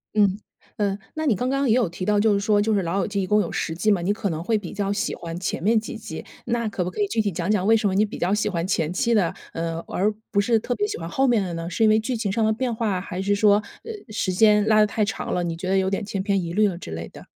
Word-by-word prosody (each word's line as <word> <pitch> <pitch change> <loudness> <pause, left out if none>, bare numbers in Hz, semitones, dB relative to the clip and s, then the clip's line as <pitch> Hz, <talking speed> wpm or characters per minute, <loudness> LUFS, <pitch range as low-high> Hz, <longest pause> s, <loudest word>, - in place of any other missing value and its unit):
嗯， 205 -2 +3 0.4
呃， 200 -2 0 0.2
那 315 0 -2
你 255 -8 +3
刚 250 +6 -1
刚 275 +1 +1
也 225 - +4
有 240 -8 +2
提 180 +2 -5
到， 210 +1 +2
就 215 0 +4
是 200 - +2
说 205 0 +2
就 220 +2 +1
是 200 -2 +1
老 175 +3 -1
友 185 - 0
记 200 -1 -1
一 - - -1
共 210 +3 +3
有 175 - -3
10 160 - -2
季 175 +6 0
嘛， 200 -4 +3
你 195 +4 +1
可 210 -1 -2
能 160 -1 -3
会 220 +4 +1
比 185 -5 -8
较 200 -1 -1
喜 200 - -2
欢 165 0 -6
前 185 - -3
面 220 +3 +4
几 220 - -7
季。 170 -7 -7 0.2
那 235 -2 -1
可 200 -3 -2
不 180 - -4
可 210 - -4
以 205 - +2
具 225 +3 -2
体 210 -2 +1
讲 175 +1 -3
讲 205 -3 +2
为 225 +2 +5
什 215 -2 +1
么 190 - 0
你 210 +2 +4
比 210 - -8
较 180 - 0
喜 210 - +1
欢 170 -4 -1
前 170 -3 0
期 235 +5 +1
的， 185 -6 +2 0.2
呃， 165 0 -3
而 205 +3 0 0.2
不 200 - +2
是 225 +2 +3
特 245 +3 -2
别 415 - 0
喜 430 +1 -4
欢 - - -5
后 270 0 +1
面 235 -4 +3
的 180 -2 -4
呢？ 165 0 -4
是 200 +6 -1
因 220 - +6
为 215 +1 +4
剧 245 +3 -2
情 220 -4 -2
上 220 +2 +1
的 220 - +2
变 245 +2 -2
化， 215 -5 -1
还 180 -1 -6
是 200 +2 +1
说， 205 0 +5 0.3
呃， 455 - -6 0.2
时 210 -3 -1
间 210 +2 +5
拉 215 -1 +5
得 210 - +6
太 210 +1 -1
长 210 - -3
了， 180 - 0
你 165 -1 -3
觉 185 - -5
得 190 +1 +2
有 190 0 +1
点 200 +2 -2
千 195 -1 -3
篇 200 0 +1
一 170 0 -5
律 210 +2 +4
了 185 -4 -3
之 175 - -9
类 80 +1 -5
的？ - - -13
205 Hz, 345 characters per minute, -24 LUFS, 185-220 Hz, 0.4 s, 因